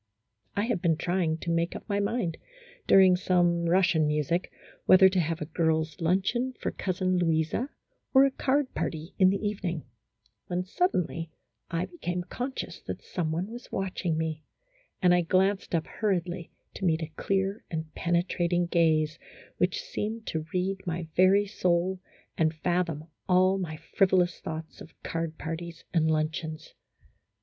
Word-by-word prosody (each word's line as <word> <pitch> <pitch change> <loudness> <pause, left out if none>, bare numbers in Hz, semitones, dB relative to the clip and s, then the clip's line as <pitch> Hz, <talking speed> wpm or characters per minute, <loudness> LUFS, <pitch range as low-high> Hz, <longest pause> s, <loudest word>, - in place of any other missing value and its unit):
I 205 - +1
had 225 -6 -1
been 165 -3 +2
trying 175 -2 0
to 170 - -2
make 170 +1 0
up - - -8
my 200 -2 0
mind, 200 -5 -1 0.5
during 190 -1 +7
some 175 -2 +2
Russian 175 -4 +3
music, 150 +4 0 0.4
whether 185 0 +8
to 185 0 +1
have 165 0 -1
a - - -1
girls' 160 -1 0
lunch 185 +7 +2
eon 255 +2 -1
for - - -2
Cousin 185 -1 0
Louisa, 165 - +1 0.4
or 265 0 +7
a 275 - +2
card 275 +1 0
party 160 +1 -3
in 185 -1 +7
the 195 - +1
even 200 -3 -2
ing, 165 -3 -5 0.6
when 180 0 -1
suddenly 180 - 0 0.4
I 170 +1 -1
became 180 -1 -4
conscious 250 +8 -5
that - - -5
some 165 -4 -2
one 180 +6 -2
was 240 +1 -9
watching 180 -3 -1
me, 160 -1 -2 0.6
and 180 -1 +6
I 180 - +4
glanced 190 +2 +1
up 160 - 0
hurriedly 180 -5 -2 0.2
to - - -8
meet 165 -2 +2
a 160 - -6
clear 195 +2 -1
and 160 -1 -4
penetrating 175 0 +1
gaze 160 -2 +2 0.4
which - - +1
seemed 225 - -4
to 160 -1 -3
read 190 +1 -1
my 170 -1 -3
very 190 +3 +5
soul 185 -2 0 0.4
and 160 -1 +2
fathom 170 -2 -1 0.3
all 185 +1 +4
my 160 -4 -4
frivolous 185 0 +2
thoughts 160 0 -7
of 160 - -13
card 165 -1 -3
parties 165 +1 -6
and 160 -2 +3
luncheons. 155 0 -2
175 Hz, 160 wpm, -28 LUFS, 160-190 Hz, 0.6 s, whether